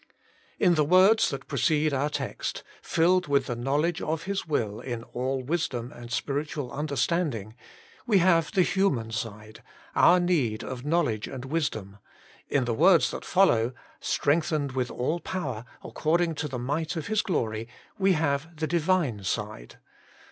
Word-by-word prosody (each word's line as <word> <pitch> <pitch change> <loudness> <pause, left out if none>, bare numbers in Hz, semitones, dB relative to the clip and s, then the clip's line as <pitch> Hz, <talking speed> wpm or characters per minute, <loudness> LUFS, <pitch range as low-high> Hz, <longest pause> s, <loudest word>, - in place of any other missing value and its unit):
In 180 -3 +4
the 155 -2 +3
words 185 +8 +5
that 135 0 -5
precede 150 +2 +1
our 140 +2 +1
text, - - -4
' - - -23
filled 180 +2 +2
with 140 -2 +2
the 120 - -3
knowledge 145 +8 0
of 160 +1 -2
His 195 -1 -3
will 110 -9 -1
in 120 -3 -5
all 130 +2 -3
wisdom 130 -5 -2
and 120 0 -11
spiritual 145 +1 -2
understanding,' 140 - -1 0.5
we 215 -4 +4
have 170 -3 +3
the 190 -4 +4
human 155 - 0
side, 110 -1 -6 0.3
our 180 +1 +6
need 150 -12 +1
of 125 -1 -6
knowl 165 +2 +2
edge 110 -2 -3
and 130 -1 -7
wisdom; 110 -10 -3 0.5
in 135 -3 +1
the 120 - 0
words 170 +6 +5
that - - -6
follow, 130 -11 +3 0.2
* - - -30
strengthened 150 -1 0
with 130 -1 -1
all 155 +8 -1
power, 130 -12 -4 0.2
according 165 +1 0
to 150 0 -3
the 130 -3 -5
might 150 +7 -2
of 160 -2 -4
His 215 0 +1
glory,' 115 - -2 0.3
we 195 0 +4
have 160 0 -1
the 155 0 -2
Divine 165 - +1
side. - - -4
145 Hz, 160 wpm, -27 LUFS, 125-170 Hz, 0.5 s, our